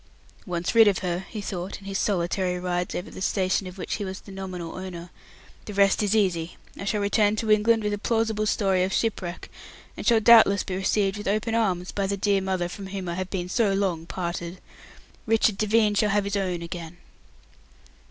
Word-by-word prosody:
"Once 175 +2 -2
rid 225 -2 +7
of 200 -3 +3
her," 180 +1 -2
he 215 - -5
thought, 185 -1 -5
in 195 - -15
his 195 0 -5
solitary 180 -1 0
rides 180 0 -2
over 180 - -5
the - - -9
station 190 -1 0
of 185 +1 -10
which - - -3
he 210 - -4
was 190 0 -5
the 200 - -13
nominal 185 -3 -6
owner, 180 -2 -7 0.5
"the 210 - -7
rest 200 +1 +4
is 210 0 +1
easy. 175 -5 0 0.2
I 200 - -7
shall 210 +1 0
return 205 +1 +2
to 215 0 -1
England 220 +1 +4
with 210 0 0
a 205 - -3
plausible 220 -1 0
story 190 -3 +2
of 185 - -1
shipwreck, 190 -5 -2 0.4
and - - -6
shall 230 -2 +4
doubtless 220 -3 +6
be 185 - -4
received 195 +1 0
with 205 - -6
open 215 +3 0
arms 185 -6 0
by 200 -1 -1
the 200 +1 -1
dear 200 0 +2
mother 185 -2 -1
from 195 +2 -8
whom 190 -1 -5
I 170 - -2
have 185 +1 -4
been 180 -2 -3
so 205 +1 +1
long 180 -5 -1
parted. 175 0 -4 0.7
Richard 220 -2 +2
Devine 215 0 +3
shall 210 +1 +2
have 205 0 +2
his 200 +1 -2
own 180 -4 -1
again." 170 0 -7
195 Hz, 205 wpm, -25 LUFS, 180-210 Hz, 0.7 s, rid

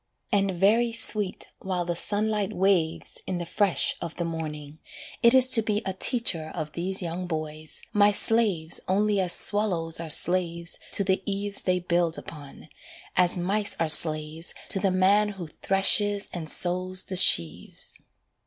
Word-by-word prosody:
And 195 -1 +1
very 210 +6 +1
sweet 210 -4 0
while 180 -2 -3
the 175 0 -3
sunlight 210 +2 -1
waves 180 -4 -1
In 185 - -3
the 175 - -5
fresh 195 +2 +1
of 170 -1 -6
the 170 - -4
morning, 155 -2 -7 0.4
it 235 +2 +4
is 260 -1 +5
to 225 - +5
be 210 0 -2
A 190 - -3
teacher 185 -7 -1
of 155 -3 -5
these 185 +4 -3
young 175 +2 -5
boys, 155 -1 -4
my 205 0 +4
slaves 205 -7 0
Only 205 +2 0
as 180 -2 0
swallows 175 -7 -1
are 165 -1 -6
slaves 170 +1 +2
to 200 - +6
the 190 0 0
eaves 200 0 -3
They 185 -1 0
build 175 -2 -1
upon, 145 -3 -11 0.5
as 180 0 +2
mice 200 +4 -2
are 165 -1 -1
slaves 155 +1 +3
To 195 - +4
the 195 0 0
man 195 +3 +2
who 195 -4 -8 0.2
threshes 200 +1 +2
and 160 -3 -5
sows 185 +2 +2
the 190 - -6
sheaves. 85 - +2
185 Hz, 160 wpm, -25 LUFS, 165-205 Hz, 0.5 s, to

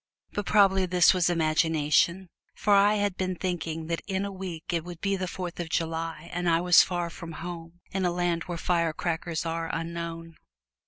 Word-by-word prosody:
But 205 - -4
possibly 195 -3 +4
this 180 0 +5
was 180 -2 +2
imagination, 160 +2 +2 0.3
for 205 - +2
I 200 +1 +5
had 205 -2 -1
been 185 -1 -1
thinking 165 -3 -3
that 165 0 -2
in 195 0 -1
a 200 - -4
week 180 -3 -6
it 165 -2 0
would 175 -1 -9
be 195 +1 0
the 185 -1 -3
Fourth 180 -1 -6
of 170 -2 -4
July 165 0 -3
and 175 0 0
I 165 0 +4
was 175 0 +7
far 175 -2 -2
from 165 0 -8
home 170 0 -8
in 190 0 -1
a 180 - +2
land 175 -1 -1
where 175 -2 -4
firecrackers 170 -1 -1
are 165 0 -2
unknown. 165 0 -5
175 Hz, 190 wpm, -27 LUFS, 165-185 Hz, 0.3 s, was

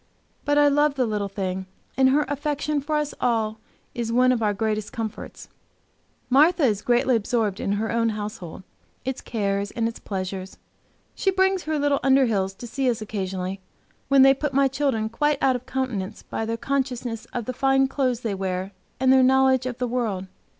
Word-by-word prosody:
But 290 0 +2
I 290 0 +6
love 290 0 +3
the 255 -2 +1
little 210 -2 -2
thing, 190 -1 -4 0.3
and 265 0 +4
her 290 +2 +3
affection 290 0 -1
for 305 +2 -2
us 300 -1 -1
all 220 -3 0 0.3
is 235 -2 -3
one 250 +2 +4
of 245 -2 0
our 210 -1 +2
greatest 215 0 -2
comforts. 225 -2 -6 0.8
Martha 305 +6 +4
is 210 -6 +2
greatly 245 +2 +2
absorbed 215 -2 0
in 200 - -1
her 220 +2 -1
own 230 0 +1
household, 205 -5 -6 0.4
its 265 0 -3
cares 200 -3 -2
and 230 +1 -1
its 230 - -6
pleasures. 190 -1 -5 0.6
She 390 - 0
brings 380 -1 +1
her 310 0 -1
little 285 -1 +2
Underhills 225 -8 +2
to - - -8
see 260 +2 -1
us 235 - -1
occasionally, 190 -3 -4 0.5
when 275 -1 +6
they 270 0 +7
put 275 0 -3
my 275 0 +5
children 265 -5 0
quite 295 +6 0
out 260 -1 +3
of 250 0 -6
countenance 250 -8 -3
by 225 - -4
their 230 0 -2
consciousness 250 -3 -2
of 245 -3 -5
the 255 - -3
fine 270 +1 +3
clothes 260 -3 -1
they 225 -4 -2
wear, 190 0 -3 0.3
and 260 0 +4
their 265 - +6
knowledge 260 0 +4
of 245 -2 -5
the 250 - -1
world. 225 -6 -2
245 Hz, 185 wpm, -24 LUFS, 210-270 Hz, 0.8 s, they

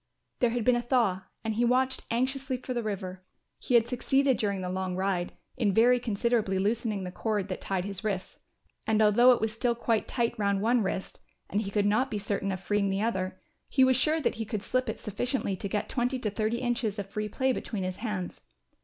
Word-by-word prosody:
There 245 - +3
had 235 -1 -1
been 250 - +5
a 240 - +1
thaw 235 -7 +1 0.2
and 220 -1 -1
he 230 +3 +1
watched 255 +2 +1
anxiously 260 +2 -1
for 255 +1 -5
the 240 - -1
river. 190 -4 -4 0.4
He 250 - 0
had 235 -1 +5
succeeded 270 +2 +2
during 200 -3 -1
the 180 - -3
long 185 0 -2
ride, 185 -2 -1 0.3
in 210 -6 +1
very 245 +2 +5
considerably 225 -3 0
loosening 210 0 0
the 180 - -5
cord 205 0 -2
that 185 - -4
tied 190 -2 -2
his 200 0 -5
wrists, 195 -3 -3 0.5
and 220 -1 +3
although 220 +4 +6
it 245 - +3
was 220 -1 -1
still 235 +1 0
quite 230 -2 0
tight 235 -2 0
round 200 -1 +2
one 235 +1 +3
wrist 190 -1 -3 0.3
and 205 - +1
he 200 - -4
could 205 0 +1
not 215 +6 +2
be 215 - -2
certain 200 -1 -1
of 185 - -3
freeing 205 +1 0
the 195 +2 0
other, 185 -4 -2 0.3
he 265 - +4
was 260 0 +5
sure 305 +6 +3
that 285 - 0
he - - +1
could 215 -2 -4
slip 255 0 0
it - - -3
sufficiently 215 0 -2
to 195 +2 -4
get 210 - -1
twenty 250 +1 0
to 220 -4 -2
thirty 215 +3 -1
inches 240 -4 -1
of 200 -1 -4
free 210 0 -3
play 260 +5 +1
between 210 -5 -4
his 185 0 -3
hands. 210 -6 -4
215 Hz, 225 wpm, -29 LUFS, 195-245 Hz, 0.5 s, although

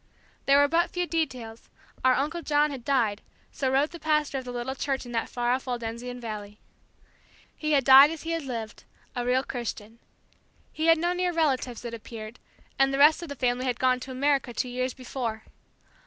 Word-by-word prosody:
There 275 0 +6
were 285 0 +5
but 335 +3 +2
few 355 0 -2
details. 255 -10 -4 0.3
Our 260 -1 +5
Uncle 315 +5 -1
John 295 -1 +2
had 265 -4 -7
died; 230 -6 +1 0.3
so 265 -2 -1
wrote 280 +4 +2
the 340 - -9
pastor 300 -3 0
of 260 - -10
the 250 - -5
little 245 +2 -3
church 270 -1 -2
in 240 - -9
that 230 -1 -2
far 240 0 -1
off 260 +1 -1
Waldensian 245 0 -4
Valley. 210 -3 -7 1.0
He 305 0 -1
had 275 -2 +4
died 270 +2 +9
as 325 -1 -6
he 330 - -3
had 330 0 -1
lived 235 -5 -6 0.3
a 245 - -1
real 250 +2 +2
Christian. 230 -3 -6 0.7
He 315 +1 -1
had 330 0 +6
no 345 +2 0
near 360 0 0
relatives, 265 -7 -1
it 235 - -5
appeared; 225 0 -9 0.4
and 270 0 +4
the 270 - -1
rest 300 +4 +6
of 340 - -7
the 285 - -5
family 250 0 0
had 245 -2 -1
gone 255 -1 +3
to 260 - -9
America 270 -1 0
two 250 - -1
years 255 +1 -2
before. 240 -4 -5
260 Hz, 200 wpm, -27 LUFS, 240-295 Hz, 1.0 s, died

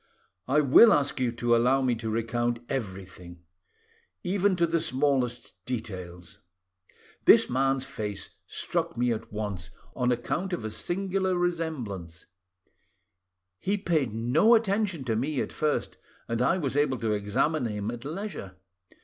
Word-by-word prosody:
I 145 +4 +4
will 150 - +8
ask 140 -2 +1
you 125 -2 +1
to 120 0 +2
allow 130 +3 +3
me 125 -2 +2
to 115 -1 -4
recount 115 +2 -1
everything; 95 -6 -6 0.8
even 195 +1 +2
to 170 -1 +3
the 165 0 +1
smallest 135 -5 0
details. 90 -8 -6 0.9
This - - +6
man's 135 +1 +1
face 105 -3 -5 0.2
struck - - -2
me 120 0 +2
at 115 +1 -7
once, 105 -6 -4 0.3
on 125 -1 +1
account 175 +10 -2
of 170 - -3
a 110 - -3
singular 190 - -1
resemblance; 130 - -3 1.3
he 200 +2 0
paid 160 - 0
no 125 - +4
attention 200 -7 0
to 115 -3 -1
me 135 +5 -1
at - - -3
first, 150 -1 -1 0.3
and 115 +1 -1
I 170 +8 +3
was 140 -7 -2
able 145 -3 +2
to 115 -2 -1
examine 105 +8 0
him 105 0 -3
at 120 0 -8
leisure. 150 - -6
125 Hz, 140 wpm, -27 LUFS, 110-160 Hz, 1.3 s, will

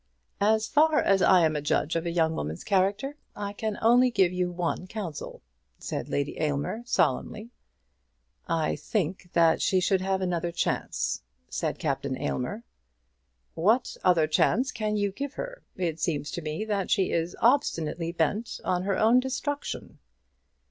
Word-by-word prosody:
"As 215 +2 +3
far 305 +1 +4
as 195 -1 +3
I 180 -3 +6
am 155 -1 +1
a 150 - -1
judge 150 +2 0
of 165 +1 -1
a - - -1
young 165 -2 +2
woman's 80 - -4
character, 200 +9 0 0.2
I 205 -1 -4
can 215 0 -3
only 245 +3 +6
give 190 -6 +2
you 180 0 0
one 175 +1 -3
counsel," 185 -7 -6 0.3
said - - -5
Lady 140 0 -2
Aylmer 150 +8 -1
solemnly. 220 -1 0 1.0
"I 165 -3 0
think 185 -3 -2
that 165 -1 +4
she 190 - +3
should 185 +1 +2
have 190 0 0
another 175 -2 -1
chance," - - -1 0.3
said - - -2
Captain 135 -3 -2
Aylmer. 205 - -3 0.9
"What 220 +9 +2
other 170 -4 +4
chance 235 +11 +2
can 215 -1 -2
you 205 -1 0
give 280 +7 -5
her? - - -6
It 170 -3 -2
seems 150 -3 -1
to 175 - -4
me 155 +6 -3
that 205 -3 -1
she 190 -4 +2
is 165 +1 -1
obstinately 170 - +1
bent 190 +7 -1
on 180 -1 +1
her 195 -1 0
own 230 +3 +5
destruction." 275 +3 -4
185 Hz, 155 wpm, -27 LUFS, 165-220 Hz, 1.0 s, I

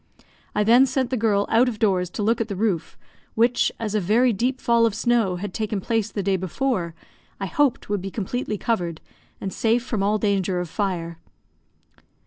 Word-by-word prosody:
I 210 - +3
then 240 +5 +6
sent 260 -1 -1
the - - +1
girl 210 -3 +2
out 240 +3 +4
of 225 - -6
doors 190 -5 +1
to 210 - -2
look 230 +3 +2
at 225 - -1
the 200 - -4
roof, 190 -4 -1 0.4
which, 235 +2 +3
as 220 -3 -3
a 215 - +2
very 225 +6 +3
deep 250 +6 -1
fall 235 -1 +3
of 215 - -3
snow 225 -4 +1
had 185 +1 -5
taken 215 -2 -2
place 225 +2 -1
the 200 - -3
day 195 0 +1
before, 185 - -2 0.4
I - - -2
hoped 290 -6 +1
would 205 -2 -1
be 195 - -5
completely 215 +2 -3
covered, 175 -8 -2 0.4
and 190 - -4
safe 230 +2 +1
from 220 -5 -2
all 205 +2 +2
danger 195 -3 0
of 180 -2 -4
fire. 170 -5 -3
215 Hz, 195 wpm, -23 LUFS, 190-235 Hz, 0.4 s, then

